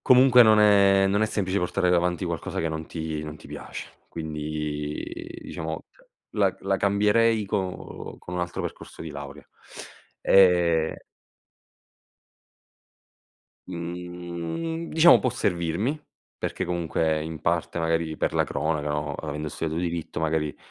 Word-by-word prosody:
comunque 125 -1 +7
non 110 -1 +6
è 100 -2 +6
non 100 +2 +2
è 110 - +3
semplice 100 -2 -1
portare 90 -1 +1
davanti 90 0 +1
qualcosa 85 -3 -3
che 80 - 0
non 80 0 -4
ti 80 -2 -4
non 75 0 -7
ti - - -15
piace, - - -8 0.2
quindi, 75 -1 -4 0.4
diciamo, 80 -1 -5
cioè, - - -26 0.2
la - - +2
la 95 0 0
cambierei 105 +3 +3
con 95 -2 -4
con 90 - -8
un 90 - -1
altro 85 0 -3
percorso - - -7
di 80 - -6
laurea. 70 0 -8 0.8
E 85 -4 +4 2.7
Mhmm, 90 - -5
diciamo 165 +2 +7
può 125 - 0
servirmi, 100 - -1 0.4
perché - - -2
comunque 80 -3 0
in 80 -2 -6
parte, 85 0 0
magari, 80 -1 0
per - - 0
la - - +2
cronaca, 75 0 -1
no, 75 -1 -2
avendo 75 +1 -4
studiato 80 +1 -3
diritto, 85 -2 -3
magari 75 -2 0
85 Hz, 135 wpm, -26 LUFS, 80-100 Hz, 2.7 s, comunque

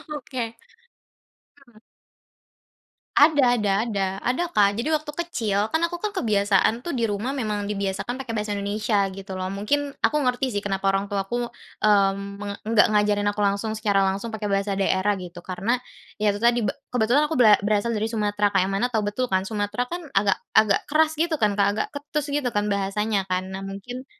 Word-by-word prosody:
oke. 255 -3 -4 1.1
Mhm. 240 -6 -23 1.4
Ada 285 -5 +5
ada 210 -2 0 0.2
ada, 200 -3 0 0.2
ada 255 +8 0
Kak. 200 -4 +3
Jadi, 235 - -1
waktu 305 0 -2
kecil, 220 -12 -1 0.2
kan, 320 - +3
aku, 340 +1 0
kan, 420 +3 -3
kebiasaan 215 - +2
tuh 345 - -2
di 240 - -1
rumah 210 +6 -2
memang 210 -6 -2
dibiasakan 200 +3 -2
pakai 265 - -7
bahasa 210 0 -2
Indonesia, 205 0 0
gitu, 195 0 -9
loh. 185 0 -3
Mungkin 280 +9 -1
aku 300 - +3
ngerti, 250 -1 0
sih, 205 - -1
kenapa 195 -1 -2
orang 195 +1 -1
tuaku, 205 +5 -2 0.3
mmm, 200 -1 +2
me 205 - -6 0.2
enggak 220 0 +4
ngajarin 205 0 +2
aku 205 - -5
langsung, 200 +2 0
secara 205 -2 +2
langsung 195 +4 -2
pakai 220 -1 -4
bahasa 200 0 0
daerah, 195 +1 +2
gitu, 175 -1 -9
karena 200 +8 -1 0.4
ya 210 -1 +3
itu 205 - -3
tadi, 235 +2 +3
be 210 - +1 0.2
kebetulan 245 +6 +3
aku 320 - -3
bera 225 -6 +6
berasal 205 +2 0
dari 215 +1 0
Sumatera, 205 -2 0
Kak. 195 - +5
Yang 190 +1 -1
mana 245 - +2
tahu 220 -2 +1
betul 255 +5 -1
kan, 190 -5 +1
Sumatera 205 +2 -2
kan 350 +1 -4
agak-agak 200 +1 +3
keras, 310 +1 +3
gitu, 330 0 +1
kan, 210 -1 +2
Kak. 200 - +4
Agak 215 - -1
ketus 290 +1 -3
gitu 285 -3 0
kan 205 0 0
bahasanya, 200 0 0
kan. 185 0 -2
Nah, 190 0 -6
mungkin 245 +7 -7
210 Hz, 185 wpm, -24 LUFS, 200-245 Hz, 1.4 s, bera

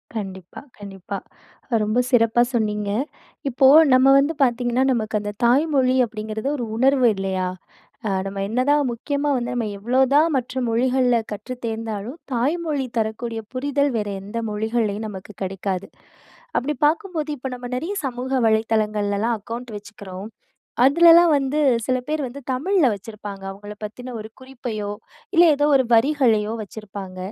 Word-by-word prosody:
கண்டிப்பா, 190 -4 -6 0.2
கண்டிப்பா. 200 -1 -7 0.7
ரொம்ப 215 +3 +1
சிறப்பா 230 -1 +4
சொன்னீங்க. 210 -3 -1 0.6
இப்போ 265 +1 +4 0.3
நம்ம 255 +1 +5
வந்து 285 +4 +1
பாத்தீங்கன்னா, 245 0 +1
நமக்கு 220 -2 -1
அந்த 205 0 -4
தாய் 260 +6 +4
மொழி 260 -1 +3
அப்படிங்கிறது 220 +2 -4
ஒரு 245 - -3
உணர்வு 260 0 +4
இல்லையா? 190 -1 -2 0.6
அ - - 0 0.2
நம்ம 195 0 -5
என்னதான் 265 +7 +2
முக்கியமா 285 +5 -2
வந்து 245 -1 -2
நம்ம 240 -2 -1
எவ்ளோதான் 265 +8 +3
மற்ற 255 +1 -3
மொழிகள்ல 250 +1 +2 0.2
கற்றுத் 240 +5 -7
தேர்ந்தாலும், 225 +3 -4 0.2
தாய்மொழி 290 +3 0
தரக்கூடிய 225 +1 -2
புரிதல், 280 +2 0
வேற 210 -1 -2
எந்த 205 +4 -7
மொழிகள்லயும் 220 0 -1
நமக்கு 195 +1 -9
கிடைக்காது. 190 0 -3 0.7
அப்டி 295 +4 -2
பாக்கும்போது, 320 -1 -1
இப்ப 265 +1 -5
நம்ம 245 0 -7
நெறைய 330 +10 -3
சமூக 250 0 -4 0.2
வலைதளங்கள்லலாம் 220 0 +1
அக்கவுண்ட் 230 +3 -7
வெச்சுக்கறோம். 205 -2 -9 0.6
அதுலலாம் 335 +4 +7
வந்து 275 +1 -1 0.3
சில 255 -1 +1
பேர் 310 0 -1
வந்து 260 +3 -8
தமிழ்ல 320 +5 +2
வச்சிருப்பாங்க. 205 -1 -9
அவுங்கள 205 +2 -9
பத்தின 245 +4 -7
ஒரு 215 - -8
குறிப்பையோ, 240 -6 -5 0.5
இல்ல 345 - +8
ஏதோ 290 +1 +2
ஒரு 260 - +3
வரிகளயோ 230 -4 +3
வச்சிருப்பாங்க. 200 -3 -9
235 Hz, 135 wpm, -22 LUFS, 210-265 Hz, 0.7 s, இல்ல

